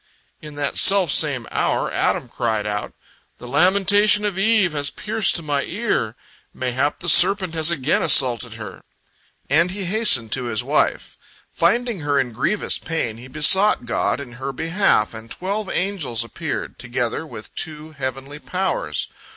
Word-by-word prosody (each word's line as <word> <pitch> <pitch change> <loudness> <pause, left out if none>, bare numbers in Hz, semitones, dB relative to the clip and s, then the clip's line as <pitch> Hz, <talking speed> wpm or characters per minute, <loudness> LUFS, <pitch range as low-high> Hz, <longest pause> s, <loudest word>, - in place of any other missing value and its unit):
In 150 -1 -11
that 145 -1 -2
self 195 -6 +4
same 140 -7 +2
hour, - - -1
Adam - - 0
cried 110 -3 -2
out: 105 -1 -4 0.4
"The 125 - -11
lamentation 200 +8 +3
of 205 -3 -2
Eve 200 -2 +2
has 145 -1 -2
pierced 215 0 0
to 170 - -2
my 145 -2 -1
ear! 180 - -2 0.4
Mayhap 130 +3 -2
the 175 - -4
serpent 185 +1 +6
has 160 0 +2
again 155 -4 +1
assaulted 120 -3 +3
her," 105 -4 -9 0.7
and 165 +5 +2
he 195 +1 -5
hastened 180 - +2
to 125 +1 -2
his 110 -3 -1
wife. - - -1 0.3
Finding 235 +5 0
her 145 -2 0
in 130 -3 -2
grievous 190 - -1
pain, 120 -9 -4
he 120 +3 -12
besought 155 +4 +4
God 120 - -1
in 135 -4 -9
her 135 +1 -3
behalf, 165 - 0
and 110 0 -10
twelve 195 - -4
angels 175 - -1
appeared, 115 - -6
together 120 +3 -2
with 115 -9 -11
two 155 -1 -5
heavenly 135 0 -6
powers. 180 - -2
150 Hz, 155 wpm, -20 LUFS, 125-190 Hz, 0.7 s, serpent